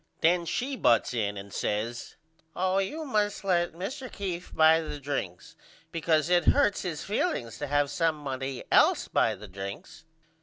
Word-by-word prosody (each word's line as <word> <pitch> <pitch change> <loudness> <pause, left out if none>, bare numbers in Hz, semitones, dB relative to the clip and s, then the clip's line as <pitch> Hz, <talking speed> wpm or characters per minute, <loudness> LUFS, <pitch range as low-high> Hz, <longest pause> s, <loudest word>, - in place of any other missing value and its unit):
Then 170 +1 +3
she 265 +8 -2
butts 120 - +3
in 105 -4 -1
and 100 0 -9
says 115 +3 -3 0.4
Oh 185 +1 +1
you 305 +12 -3
must 210 -6 0
let 175 -3 +1
Mr. 250 - -6
Keefe 180 -3 -5
buy 160 +1 +5
the 150 -2 -6
drinks 135 -11 -5 0.4
because 160 -2 +1
it 175 0 +3
hurts 265 -8 +3
his 170 -5 -4
feelings 120 - -2
to 145 - -3
have 145 0 +1
somebody 135 -5 -2
else - - +4
buy - - +2
the 105 +2 -11
drinks. 100 - -8
160 Hz, 155 wpm, -28 LUFS, 130-190 Hz, 0.4 s, buy